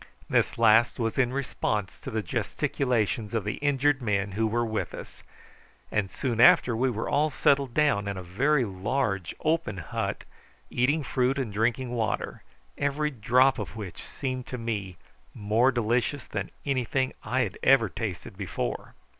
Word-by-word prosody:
This - - +1
last 115 0 +5
was 115 +2 -1
in 125 -1 +3
response 105 -7 -2
to - - -7
the 110 -1 -2
gesticulations 115 -2 -1
of 110 - 0
the 105 +1 -3
injured 145 -1 +2
men 100 -3 0
who 110 +3 0
were 120 +2 0
with 110 -1 -3
us, - - -10 0.7
and 105 -3 0
soon 120 0 -3
after, 120 -1 +6
we 130 +3 +2
were 115 -2 -3
all 150 +2 +2
settled 140 -3 +2
down 140 -10 +2
in 100 -1 -3
a 95 - -6
very 130 +10 +2
large 100 -1 -2
open 155 - 0
hut, 85 - -3 0.5
eating 145 +6 +2
fruit 130 0 +1
and 125 -7 -2
drinking 120 +4 0
water, 115 -4 -2 0.4
every 145 +1 0
drop 125 +2 +3
of 105 - -5
which 105 -6 -7
seemed 130 -1 -4
to 125 - -5
me 105 -6 -4 0.4
more 115 +4 +2
delicious 120 +4 0
than - - -4 0.2
anything 130 -1 0
I 130 +1 0
had 100 -7 -3
ever 130 -4 +5
tasted 100 -2 -5
before. 85 - -4
120 Hz, 160 wpm, -27 LUFS, 105-135 Hz, 0.7 s, after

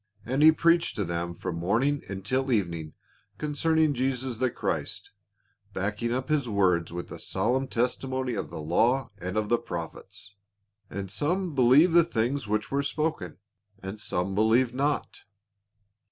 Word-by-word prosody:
And 130 +5 0
he 155 +1 +9
preached 170 +2 +2
to 105 - -1
them 85 0 -3
from 85 - -4
morning 115 +12 +1
until 130 +8 -1
evening 85 -8 -1 0.4
con 150 +4 -3
cerning 160 0 +2
Jesus 130 -1 -1
the 130 +2 +1
Christ, - - -4 0.6
backing 105 +5 -2
up 130 +2 -2
his 145 -5 0
words 90 -5 +2
with 85 0 -6
the - - -8
solemn 125 +8 0
testimony 130 +1 -1
of - - -3
the - - -7
law 120 - +2
and 90 +3 -4
of 105 -1 0
the 120 - +3
prophets. 85 +4 -7 0.3
" 100 0 -47
And 100 -1 -5
some 175 - -1
believed 140 +6 +5
the 170 0 +7
things 125 -4 -1
which 105 +1 -1
were 140 +1 +1
spoken, 140 - -2 0.4
and 100 +2 -7
some 90 0 -1
believed 115 +4 +3
not." 145 +3 -1
120 Hz, 155 wpm, -27 LUFS, 100-140 Hz, 0.6 s, he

